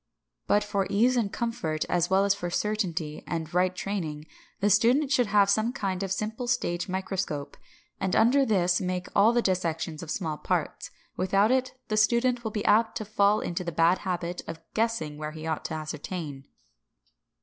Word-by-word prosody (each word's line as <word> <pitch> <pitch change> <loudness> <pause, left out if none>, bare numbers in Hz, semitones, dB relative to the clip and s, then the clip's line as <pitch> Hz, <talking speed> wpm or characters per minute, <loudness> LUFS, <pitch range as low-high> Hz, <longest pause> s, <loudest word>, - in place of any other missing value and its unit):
But 210 - +3
for 200 -2 -1
ease 235 +6 +3
and 220 -5 0
comfort, 230 -11 -2
as 175 -1 +1
well 190 +1 +4
as 200 - +4
for 175 -3 -4
certainty 175 -6 -2
and 165 0 -4
right 180 +1 +2
training, 160 -7 -4 0.3
the 205 +1 +2
student 250 +8 +4
should 245 -4 +3
have 200 -1 +4
some 215 +4 +2
kind 195 -7 -3
of 195 -2 -3
simple 220 +5 -3
stage 175 -8 -1
microscope, 185 -6 -3 0.4
and 190 -1 0
under 260 +5 +5
this 180 -7 +2
make 180 -1 -3
all 205 +3 +6
dissections 175 -8 -1
of 165 - -8
small 160 -4 -3
parts. - - -2 0.3
Without 195 +4 +3
it 255 0 +1
the 215 - -1
student 235 +3 +2
will 220 - -2
be 210 -1 -4
apt 220 +1 +3
to 215 - -5
fall 205 0 +2
into 175 +1 -3
the 170 - -3
bad 165 +3 +3
habit 175 -2 -3
of 165 0 -6
guessing 220 -10 -1
where 155 0 -5
he 155 0 -8
ought 160 -1 -2
to 160 - -3
ascertain. 155 -2 -6
195 Hz, 180 wpm, -27 LUFS, 170-220 Hz, 0.4 s, all